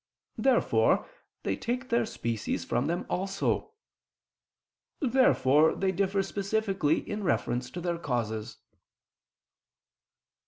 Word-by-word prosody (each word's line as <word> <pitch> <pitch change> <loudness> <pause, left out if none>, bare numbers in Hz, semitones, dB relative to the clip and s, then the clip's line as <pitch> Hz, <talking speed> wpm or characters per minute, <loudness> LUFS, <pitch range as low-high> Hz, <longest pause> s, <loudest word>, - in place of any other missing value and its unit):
Therefore 175 - +3 0.4
they 95 - 0
take 250 - -3
their 235 -1 +2
species 115 - -3
from 125 - 0
them 170 +2 -1
also. 195 - -1 1.3
Therefore 190 - +4
they 190 0 +1
differ 195 +1 +1
specifically 195 -5 0
in 210 0 -3
reference 125 -8 0
to 175 - -6
their 170 -1 -2
causes. 115 -7 -3
190 Hz, 95 wpm, -29 LUFS, 130-210 Hz, 1.3 s, Therefore